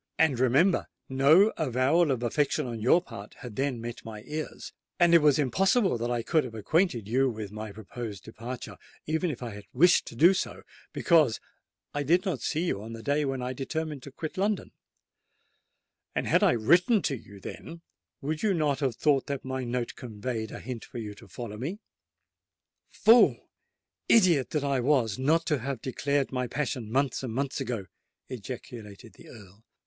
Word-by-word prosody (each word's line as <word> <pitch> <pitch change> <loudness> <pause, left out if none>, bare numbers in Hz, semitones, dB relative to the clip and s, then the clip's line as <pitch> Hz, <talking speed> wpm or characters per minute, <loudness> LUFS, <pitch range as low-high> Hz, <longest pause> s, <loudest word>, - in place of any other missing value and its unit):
And 150 -6 +3
remember—no 145 - +3
avowal 145 +3 +2
of 125 -3 -1
affection 145 +4 0
on 120 -2 -5
your 165 +10 +4
part 100 - -10
had 125 -6 -10
then 135 -1 -1
met 120 +1 -7
my 105 -2 -8
ears; 155 0 -6 0.3
and 175 -1 +5
it 170 - +7
was 150 -2 +5
impossible 190 - +2
that 120 +1 -2
I 120 -1 -1
could 160 +5 +2
have 120 -3 -8
acquainted 120 - +1
you 130 +4 +2
with 110 -4 -6
my 110 0 -6
proposed 110 0 -7
departure, 115 +3 -8 0.3
even 160 +3 0
if 130 -4 -5
I 120 - -5
had 100 0 -10
wished 175 +8 +4
so - - -11
to 175 +9 +3
do—because 155 -9 +1 0.5
I 145 - -1
did 175 +7 +2
not 185 - -2
see 160 +2 -1
you 100 - -1
on 115 +2 -8
the 115 0 -8
day 145 +3 +1
when 135 -2 -2
I 125 +1 -3
determined 150 +2 -4
to 140 - -10
quit 155 +6 -6
London: 205 0 0 1.4
and - - 0
had - - +3
I - - +5
written 175 - +3
to 140 - 0
you 100 -4 -12
then, 165 - -9 0.4
would 155 +3 -3
you 205 -3 +2
not 150 -4 +1
have 135 -5 0
thought 140 -1 +2
that 140 -2 -4
my 130 0 -3
note 120 0 -2
conveyed 110 -1 -5
a - - -8
hint 125 -2 -6
for - - -10
you 105 -3 -5
to - - -15
follow 115 -3 -7
me?" 160 - -4 1.1
"Fool—idiot 190 - +2
that 150 -2 -1
I 140 -2 +1
was 120 -5 +1
not 160 +5 +2
to 150 -4 +1
have 130 0 -4
declared 140 +3 -1
my 125 -1 -1
passion 125 -4 -3
months 135 +1 +1
and 130 -3 -4
months 140 +1 -2
ago!" 120 -7 -3 0.4
ejaculated 115 -2 -8
the - - -16
Earl. 105 -1 -15
130 Hz, 180 wpm, -28 LUFS, 115-155 Hz, 1.4 s, it